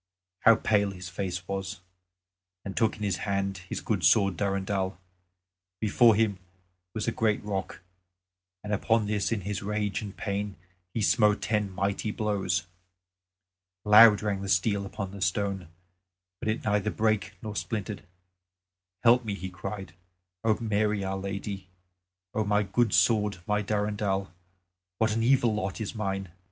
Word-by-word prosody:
how 115 -2 +7
pale 105 -2 +2
his 90 -2 -7
face 90 -1 -4
was! 95 0 -4 0.9
and 95 - -5
took 110 -1 +1
in 105 - -6
his 100 -2 0
hand 100 -1 -2
his - - -3
good 100 -5 -1
sword 95 +3 +4
Durendal. 95 0 -1 0.8
Before 110 +1 +5
him 105 -3 +1 0.6
was 110 - -2
a - - +2
great 110 -2 0
rock 95 -2 -4 0.8
and 105 0 -3
on 110 +2 +2
this 105 0 -1
in 110 -3 0
his 100 +1 -3
rage 105 0 -1
and 100 -2 -8
pain 100 0 -3 0.4
he 110 - -1
smote 105 -1 +3
ten 105 -2 0
mighty 100 +3 -1
blows. 105 -4 -1 1.2
Loud 105 0 +8
rang 100 -2 -1
the 100 - -4
steel 100 +1 +1
upon 100 -2 -5
the 100 0 -9
stone; 100 -3 -1 0.7
but - - -2
it 110 - -1
neither 105 -1 +1
brake 110 -1 0
nor 105 -1 -5
splintered. 105 -1 -3 1.0
"Help 120 +1 +6
me," 105 -3 -3
he 95 0 -6
cried, 95 0 -6 0.5
"O 110 -1 +3
Mary, 105 -2 0
our 95 0 -2
Lady! 100 0 -5 0.7
O 110 - +1
my 105 0 +2
good 110 +3 +1
sword, 105 +3 +3
my 105 0 +1
Durendal, 105 -2 -1 0.7
what 110 -1 +2
an 115 - 0
evil 120 -1 +3
lot 100 -1 -3
is 110 - -4
mine! 95 -3 -3
105 Hz, 150 wpm, -28 LUFS, 95-110 Hz, 1.2 s, Loud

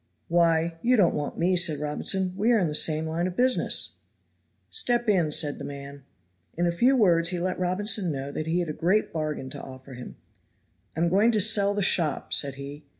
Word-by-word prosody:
"Why, 165 -1 +1
you 250 +1 +3
don't 195 -7 +3
want 145 -1 -4
me," 180 +2 +1
said 170 -4 +2
Robinson; 180 +5 -1
"we 215 +5 +1
are - - +4
in 185 -5 +1
the 150 - -4
same 155 +1 +3
line 165 +3 -2
of 180 - -6
business." 255 +3 +1 0.7
"Step 240 - 0
in," 180 -7 +2
said 150 -1 0
the - - -7
man. 140 -1 -9 0.5
In 175 - +1
a 170 - +1
few 245 +10 +2
words 170 -7 +3
he 180 -1 -3
let 180 +1 -3
Robinson 185 +1 0
know 140 0 -5
that 155 +2 -5
he 170 +2 0
had 170 - -4
a - - -3
great 185 +8 0
bargain 150 -4 -4
to 145 - -8
offer 130 0 -12
him. 125 0 -10 0.8
"I - - -1
am 170 - +2
going 200 +6 +3
to 215 - +2
sell 205 -1 +2
the 205 - -1
shop," 165 -5 +1
said 140 -2 +1
he. 140 +2 -9
170 Hz, 210 wpm, -25 LUFS, 150-195 Hz, 0.8 s, are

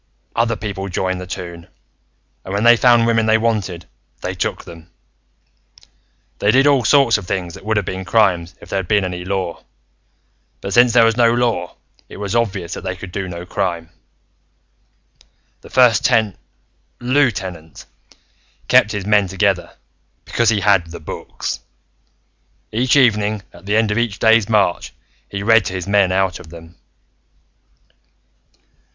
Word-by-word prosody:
Other 115 0 +1
people 100 -2 -5
joined 95 0 -2
the 90 - -8
toon, 85 -2 -8 0.8
and 95 - -8
when 100 +2 -1
they 120 0 +7
found 120 -1 +4
women 115 -1 +1
they 110 0 +4
wanted, 105 -7 -2 0.4
they - - -3
took - - -3
them. 85 +1 -13 1.5
"They 100 - +1
did 130 +5 +4
all 140 -3 +4
sorts 135 -4 +4
of 90 - -11
things 90 -3 -3
that - - -12
would 110 +1 -1
have 105 - 0
been 95 +1 -5
crimes 90 -5 +1
if - - -14
there 100 - -1
had 90 - -5
been 100 -1 +2
any 90 -1 -5
law, 95 -2 -4 1.0
but 100 - -5
since 120 -1 +5
there 115 -2 +6
was 115 0 +1
no 120 -1 +4
law, 115 -7 -1 0.3
it - - -11
was 100 +2 -4
obvious 95 -7 -1
that - - -6
they 95 0 -4
could 95 -1 -10
be 95 +1 -4
no 85 -1 -7
crime. 85 -2 -3 1.7
"The - - -14
First 125 -4 +4
Ten 110 -3 +2 0.6
Lieutenant 100 - -1 0.8
kept 105 - +4
his 100 -2 -4
men 105 -1 +3
together, 95 -1 -1 0.5
because 120 -2 +1
he 105 -3 +1
had 95 -5 +3
The 85 - -9
Books. - - -6 1.1
Each 125 +5 +1
evening, 105 -6 +2
at - - -15
the 105 - +1
end 110 -1 +2
of 105 - 0
each 115 -4 -1
day's 110 -1 +3
march, 100 -5 +1 0.4
he 100 0 -5
read 115 0 +4
to - - -4
his 95 -1 -4
men 100 -2 +2
out 95 -1 0
of 80 - -13
them." 85 +1 -13
100 Hz, 160 wpm, -18 LUFS, 90-115 Hz, 1.7 s, they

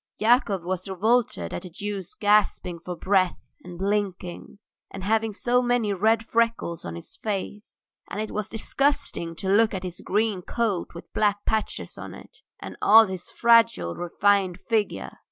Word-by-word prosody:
Yakov 215 -5 +3
was 185 +1 -3
revolted 195 - +1
at - - -4
the 185 - -9
Jew's 195 +1 -6
gasping 205 -4 +2
for 180 +1 -6
breath 185 0 +2 0.3
and 175 -1 -9
blinking, 195 -2 -3 0.3
and 195 - -8
having 220 +2 +1
so 245 +4 +1
many 245 -4 +1
red 220 +4 +2
freckles 230 -8 0
on 85 0 -6
his 85 - -10
face. 210 0 -5 0.2
And 200 - -5
it 215 - -3
was 210 -1 -3
disgusting 225 - -1
to 190 - -5
look 215 +2 +3
at 190 - -4
his 180 -1 -6
green 210 -2 0
coat 205 -4 -2
with 170 - -11
black 205 -1 +1
patches 220 -1 -2
on - - -8
it, - - -14 0.2
and - - -8
all 225 +2 +8
his 185 -3 -7
fragile, 230 - +4
refined 190 +1 +1
figure. 220 -3 -1
205 Hz, 160 wpm, -25 LUFS, 180-225 Hz, 0.3 s, all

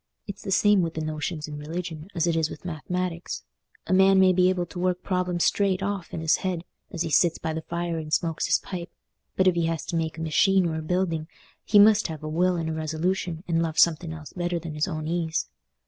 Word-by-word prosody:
It's 200 -1 -7
the - - -6
same 205 0 +4
with 165 -1 -2
the 160 - -2
notions 155 0 -3
in 150 -1 -7
religion 160 +1 -5
as 165 -1 +1
it 170 -1 +1
is 160 -1 +1
with - - -10
math'matics—a 180 +2 -5
man 190 0 +6
may 185 -1 +6
be 180 0 +4
able 180 -1 0
to 175 - -9
work 180 0 0
problems 180 -2 0
straight 195 -2 +2
off 195 -3 -3
in's 160 -1 +1
head 180 -3 -3 0.3
as 170 -1 -2
he 165 - -4
sits 170 +1 +4
by 160 -1 -3
the 160 - -3
fire 170 0 -3
and 155 -1 -7
smokes 165 0 0
his - - +4
pipe, 175 -2 -7 0.5
but 190 - +2
if 185 - +5
he 170 -1 0
has 165 -1 -2
to - - -4
make 160 -1 -2
a - - -5
machine 185 +4 +3
or 165 - -1
a - - -4
building, 165 -1 -1 0.4
he 210 - +3
must 210 +1 +6
have 155 -2 -7
a - - -4
will 175 +4 +2
and 165 -2 -2
a 160 - -2
resolution 160 +2 -2
and 165 -1 +1
love 165 -1 -2
something 165 0 +3
else 155 -2 -9
better 175 -1 -1
than 165 -2 -6
his 150 0 0
own 155 -3 -4
ease. 165 -1 -1
170 Hz, 235 wpm, -26 LUFS, 160-185 Hz, 0.5 s, man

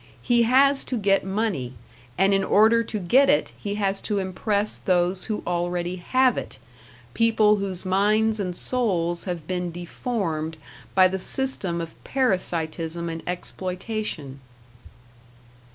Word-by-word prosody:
He 240 -1 +3
has 275 +1 +4
to 250 - -2
get 195 -2 +2
money, 190 - -2 0.4
and 195 +2 +3
in 195 0 +2
order 220 +3 +4
to 220 - -5
get 255 +9 +4
it 290 - +2
he 205 -1 -5
has 195 -1 0
to 210 - -2
impress 200 +2 -1
those 180 0 +1
who 215 -1 -3
already 175 +1 -2
have 255 +7 +2
it - - -9 0.6
people 220 -2 +3
whose 195 -2 -4
minds 210 +3 +2
and 180 -3 -3
souls 175 -9 0
have 175 -5 -4
been 180 0 -3
deformed 170 -3 -3 0.4
by 185 -1 +7
the 190 +1 -3
system 195 -6 +1
of 165 -1 -7
parasitism 170 -8 -1
and 165 0 -5
exploitation. 180 - -4
190 Hz, 135 wpm, -24 LUFS, 175-220 Hz, 0.6 s, by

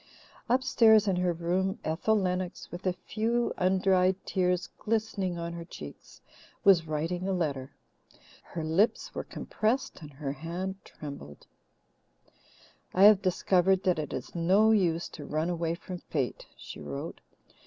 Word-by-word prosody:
Upstairs 230 -4 +5
in 190 -2 +2
her 180 0 +2
room, 180 +4 -1
Ethel 165 +8 +1
Lennox, 180 -1 -3
with 175 +2 -5
a 185 - +2
few 230 +6 -1
undried 185 0 +3
tears 180 -1 0
glistening 210 -5 -1
on 170 0 -4
her 170 0 -6
cheeks, 75 - -11 0.4
was 175 -5 +5
writing 165 +4 -2
a 195 - 0
letter. 140 -7 -2 0.7
Her 165 - -6
lips 165 +8 +1
were - - -4
compressed 220 -1 -2
and 150 -2 -10
her 135 0 -4
hand 175 +6 -5
trembled: 140 - -10 1.5
"I 190 - +5
have 205 -1 +8
discovered 185 0 +2
that 180 -4 +2
it 150 - -4
is 125 - -6
no 190 +6 +4
use 175 -6 +2
to 150 - -9
run 155 +3 -1
away 170 -1 -1
from 180 +1 -8
fate," 135 -7 -3
she - - -9
wrote. 70 -3 -6
180 Hz, 145 wpm, -29 LUFS, 165-195 Hz, 1.5 s, have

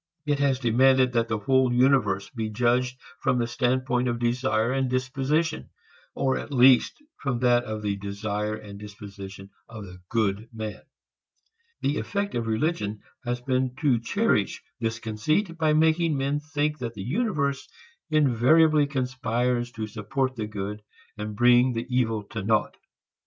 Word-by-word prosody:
It 145 -1 0
has 140 -2 +2
demanded 130 +1 +3
that 115 -1 +1
the 110 -1 -1
whole 130 +2 +2
universe 125 -6 +2
be 110 -4 -3
judged 125 +3 +1 0.2
from 125 - +1
the 120 - +1
standpoint 125 +1 0
of 120 -1 -1
desire 120 -1 0
and 135 -1 0
disposition, 135 +5 -1 0.5
or 135 -1 0
at - - -8
least 130 - +4 0.2
from 130 -4 -1
that 120 -1 +3
of 110 -1 -5
the 100 -1 -1
desire 105 +1 -3
and 105 -2 -10
disposition 100 -1 -10 0.2
of 110 -2 -8
the 90 -1 -12
good 110 -1 0
man. 110 -2 -6 1.0
The 145 - 0
effect 200 0 -2
of 115 -1 -2
religion 110 -3 -1 0.2
has 120 0 -2
been 130 0 -1
to 135 -6 +3
cherish 160 - 0 0.2
this 115 -1 -1
conceit 135 - -1
by 155 -1 +3
making 160 0 +3
men 140 +2 0
think 150 0 -2
that 115 -2 -5
the 100 - -6
universe 140 - -1 0.4
invariably 150 +2 +4
conspires 125 -2 -1
to 110 -3 -4
support 130 +5 -2
the 110 -3 -4
good 105 0 -5 0.3
and 105 -1 -5
bring 120 +2 +5
the 115 +1 -3
evil 115 -4 +1
to 110 - -4
naught. 105 +1 +1
125 Hz, 150 wpm, -26 LUFS, 110-135 Hz, 1.0 s, bring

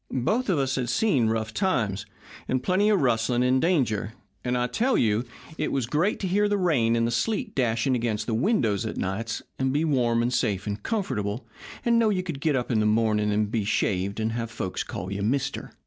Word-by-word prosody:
Both 215 - 0
of 180 - +2
us 135 -1 0
had 125 -2 -1
seen 205 - +2
rough 110 -1 -1
times 115 - 0 0.4
and 130 0 0
plenty 190 +6 +2
of 205 -3 +3
rustling 120 -1 +2
and 130 +1 +3
danger, 120 - +1 0.3
and 125 0 0
I 125 - +1
tell 240 - +1
you 110 +2 +2 0.3
it - - -1
was 135 -4 0
great 155 - 0
to 190 - -1
hear 205 +3 +2
the 205 - +1
rain 135 -12 +2
and 115 0 +2
the 115 - 0
sleet 210 - -1
dashing 120 0 +1
against 115 -3 -1
the 115 - -2
windows 115 - +1
of - - -4
nights, 110 +4 -3 0.2
and 130 0 +1
be 150 +4 +1
warm 120 -6 +2
and 120 +1 0
safe 100 -6 0
and 105 0 -4
comfortable, 120 - -2 0.4
and 235 -1 +4
know 225 -2 +3
you 185 -3 0
could 165 -6 -5
get 155 -2 +2
up 125 -1 -1
in 110 - +2
the 105 - +2
morning 105 -1 +2
and 105 0 0
be 115 -3 0
shaved 100 0 0
and 110 0 0
have 115 0 -3
folks 105 -5 -4
call 90 +1 -6
you 100 - -3
'mister.' 135 +6 -1
120 Hz, 220 wpm, -26 LUFS, 110-160 Hz, 0.4 s, and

